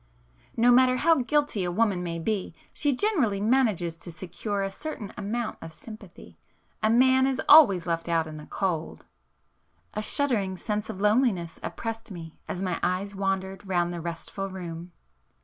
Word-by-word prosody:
No 240 +2 +5
matter 255 +1 +5
how 325 +4 +4
guilty 280 -5 +1
a 175 - -1
woman 200 -1 +1
may 170 -1 -3
be, 185 0 -2 0.2
she 290 - +1
generally 260 - +1
manages 210 -7 +1
to 175 - -10
secure 195 +4 -4
a 195 - -2
certain 225 -3 -6
amount 215 +3 -3
of 165 - -8
sympathy,—a 215 +2 -8
man 260 +3 +5
is 265 -1 -1
always 205 - +7
left 165 0 -2
out 165 -1 +2
in 155 -1 -8
the 150 - -10
cold." 170 -5 -3 0.9
A 215 - -2
shuddering 215 -6 0
sense 210 +2 -3
of 190 - -6
loneliness 210 -6 +1
oppressed 225 -1 -5
me 165 -4 -9
as 185 - -4
my 185 - -1
eyes 190 +3 -1
wandered 195 0 -2
round 175 -2 0
the 170 - -5
restful 170 +4 -5
room. 175 -2 -7
195 Hz, 160 wpm, -27 LUFS, 175-235 Hz, 0.9 s, always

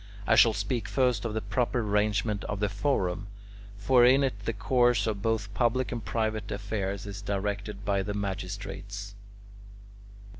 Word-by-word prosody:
I - - +3
shall 115 0 +6
speak 105 +2 -2
first 125 -5 +1
of 110 -2 -2
the 110 - -1
proper 120 +3 0
arrangement 105 0 0
of 100 - -3
the 105 0 +1
forum, 100 -4 -1 0.5
for 120 +5 +4
in 130 +3 +6
it 100 -7 -2
the - - +1
course 120 +2 +2
of 105 -3 -2
both 110 -2 -1
public 125 +2 +1
and 120 -3 -4
private 110 -2 -2
affairs 100 -1 -3
is 100 -1 -7
directed 100 +1 -3
by 100 -1 +1
the 100 +1 -3
magistrates. 100 0 -5
105 Hz, 155 wpm, -28 LUFS, 100-115 Hz, 0.5 s, shall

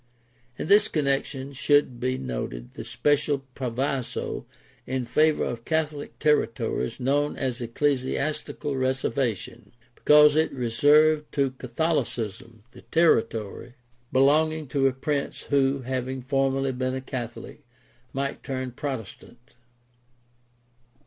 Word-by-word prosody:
In - - -3
this 205 +3 +6
connection 140 -2 -1
should 140 -2 +2
be 130 +1 -1
noted - - -5
the - - -7
special 145 -1 0
proviso 130 -1 -3 0.4
in 130 -1 -2
favor 155 +5 +3
of 120 -1 -4
Catholic 155 -1 -2
territories 115 -5 0
known 145 +3 +1
as 130 -2 -2
the 120 - -3
Ecclesiastical 140 +3 -1
Reservation, 130 -3 -2 0.2
because 150 +2 +6
it 160 +1 +2
reserved 150 +5 +3
to 140 -2 +1
Catholicism 120 - -3
the - - -14
territory 115 -7 +1 0.4
belonging 155 +4 +3
to 135 0 +2
a - - +2
prince 140 +2 -2
who, 135 -1 +2
having 130 0 -3
formerly 135 0 +1
been 130 0 -2
a 130 - -3
Catholic, 125 +1 -7 0.5
might 140 +1 -3
turn 130 -1 -4
Protestant. 125 -1 -7
135 Hz, 110 wpm, -26 LUFS, 125-145 Hz, 0.5 s, this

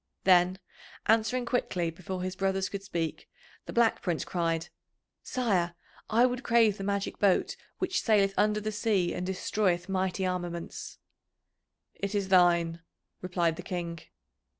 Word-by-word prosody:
Then, 180 0 +5 0.5
answering 225 +3 +2
quickly 180 -9 -1
before 185 +2 -6
his 185 0 -3
brothers 195 0 0
could 200 - -5
speak, 170 -4 -4 0.4
the - - -5
Black 235 -1 +3
Prince 175 -4 -1
cried: 165 -2 -1 0.5
"Sire, 190 -9 0 0.3
I 230 +3 +5
would 250 0 -1
crave 230 -5 +3
the - - -4
magic 200 0 -2
boat 200 -3 +2 0.2
which 370 0 0
saileth 200 -3 +3
under 210 0 +2
the 215 +1 -3
sea 210 -5 +1
and 180 - -3
destroyeth 185 -1 0
mighty 190 0 -1
armaments." 175 -2 -4 1.0
"It 200 +1 -4
is 200 -2 -1
thine," 170 -2 +4 0.4
replied 175 -3 0
the - - -5
King. 175 -2 -4
190 Hz, 140 wpm, -29 LUFS, 175-210 Hz, 1.0 s, Then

